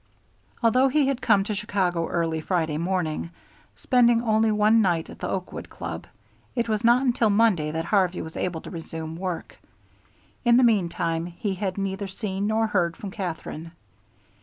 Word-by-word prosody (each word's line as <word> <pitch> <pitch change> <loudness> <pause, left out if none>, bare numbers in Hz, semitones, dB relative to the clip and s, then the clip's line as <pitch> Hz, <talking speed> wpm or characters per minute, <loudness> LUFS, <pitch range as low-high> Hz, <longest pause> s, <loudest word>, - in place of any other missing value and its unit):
Although 255 +4 +4
he 285 +2 +2
had 275 -1 +1
to - - -23
come 205 -4 +4
to 210 - -3
Chicago 190 -4 -1
early 165 -2 -1
Friday 160 -3 -1
morning, 170 -2 -1 0.5
spending 240 -2 +3
only 220 -1 +3
one 215 +2 +4
night 175 -5 0
at - - -12
the - - -3
Oakwood 185 -1 -5
Club, - - -6 0.5
it 235 -2 0
was 215 -2 -1
not 240 +3 +5
until 235 -3 +2
Monday 200 -7 +3
that 160 +2 -3
Harvey 185 -2 +2
was 160 - -9
able 170 -3 -2
to - - -9
resume 160 -2 -6
work. 180 0 -5 0.8
In 240 -1 +5
the 255 - +5
meantime 170 -6 +1
he 185 +3 -3
had 190 0 -3
neither 195 0 -2
seen 195 0 -3
nor 220 +1 +2
heard 175 -6 0
from 200 - -7
Katherine. 165 -4 -5
195 Hz, 170 wpm, -25 LUFS, 170-220 Hz, 0.8 s, not